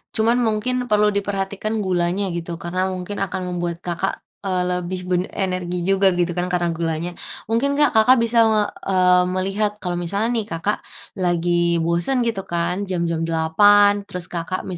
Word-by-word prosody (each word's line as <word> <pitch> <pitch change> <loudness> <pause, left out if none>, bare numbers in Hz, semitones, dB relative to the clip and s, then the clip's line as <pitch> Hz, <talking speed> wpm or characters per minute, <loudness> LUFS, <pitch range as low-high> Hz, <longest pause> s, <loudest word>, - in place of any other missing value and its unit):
Cuma 220 +1 +3
mungkin 245 +2 0
perlu 210 -1 +3
diperhatikan 200 +2 -2
gulanya, 185 +1 0
gitu. 170 0 -4
Karena 180 +3 -2
mungkin 185 +2 -5
akan 190 -1 -2
membuat 175 0 -4
Kakak, 180 +2 -3 0.2
eee, 185 -1 0 0.2
lebih 180 +1 -4
ben 180 -1 +2
energi 180 -2 -2
juga 195 0 +3
gitu 175 0 0
kan, 175 +1 -2
Karena 175 -1 0
gulanya. 165 +1 -2 0.4
Mungkin 275 +5 +1
Kak, 295 0 +3
Kakak 240 +4 +5
bisa 230 0 +2
nge 215 -1 +3 0.2
eee, 180 -1 +4
melihat, 195 +3 -1
kalau 175 -1 -2
misalnya 200 +6 -1
nih 215 - -3
Kakak, 200 +2 -2 0.4
lagi 175 -1 +1
bosen 170 +10 +1
gitu 230 -4 -1
kan. 180 +3 -1
Jam 180 -2 -1
jam 165 -1 -1
8.00, 205 +5 +4
terus 180 -1 -3
Kakak 175 +2 -3
185 Hz, 160 wpm, -21 LUFS, 175-205 Hz, 0.4 s, Kakak